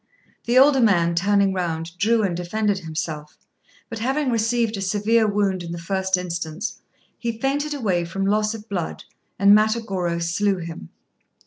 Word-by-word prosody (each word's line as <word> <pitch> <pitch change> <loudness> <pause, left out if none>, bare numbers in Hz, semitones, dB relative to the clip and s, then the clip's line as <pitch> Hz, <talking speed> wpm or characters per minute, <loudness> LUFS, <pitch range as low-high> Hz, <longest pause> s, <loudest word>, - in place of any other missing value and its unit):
The 240 +2 +2
older 270 +1 +6
man, 175 -7 +3
turning 200 +2 +2
round, 165 -2 -3
drew 225 +2 +3
and 185 -4 0
defended 200 +3 -1
himself; 155 -2 -5 0.5
but 230 - -6
having 265 +3 0
received 230 0 +1
a 195 - -5
severe 210 +3 +2
wound 200 -3 0
in 170 -1 -7
the - - -5
first 190 +2 0
instance, 170 +1 -4 0.4
he 230 -2 -3
fainted 285 +3 -1
away 190 -10 0
from 195 +3 -3
loss 215 +2 +1
of 215 0 -10
blood, 180 -6 -4 0.3
and 200 +1 +6
Matagorô 210 -6 0
slew 190 +4 0
him. 165 - -8
200 Hz, 155 wpm, -22 LUFS, 175-225 Hz, 0.5 s, older